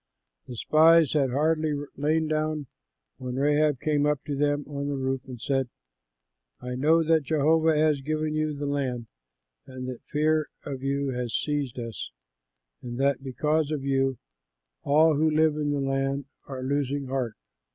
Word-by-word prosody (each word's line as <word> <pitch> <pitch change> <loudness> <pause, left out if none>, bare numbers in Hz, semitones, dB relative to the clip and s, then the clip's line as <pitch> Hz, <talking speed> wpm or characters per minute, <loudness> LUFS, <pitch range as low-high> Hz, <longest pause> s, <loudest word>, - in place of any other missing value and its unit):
The 125 - -7
spies 160 +4 +5
had 140 -4 +2
hardly 155 +3 +1 0.2
lain 155 +2 +1
down 155 -1 -1 0.5
when 125 -1 -5
Rahab 145 0 +2
came 150 0 +1
up 150 -2 0
to 145 - -3
them 145 +1 0
on 140 -1 -4
the 145 - -1
roof 135 0 -2
and 125 -2 -8
said, 135 +1 -1 0.9
"I 125 0 -5
know 155 +6 +3
that 160 0 +3
Jehovah 155 +2 +2
has 150 -2 +2
given 155 +2 -2
you 155 -1 -1
the 145 - -3
land 135 -4 -2 0.6
and 130 -1 -7
that 125 -2 -6
fear 155 +1 +1 0.2
of 135 -2 -5
you 140 0 -1
has 125 -2 -3
seized 145 -5 -1
us 115 -2 -5 0.7
and 120 0 -6
that 135 -1 +1
because 150 +3 0
of 150 -3 -3
you 135 -1 +1 0.6
all 155 +1 +4
who 155 +1 +3
live 155 0 +3
in 150 -1 -1
the 145 -1 0
land 135 0 -1 0.2
are 130 -2 -6
losing 140 +1 -1
heart. 130 -4 -2
145 Hz, 160 wpm, -26 LUFS, 135-155 Hz, 0.9 s, spies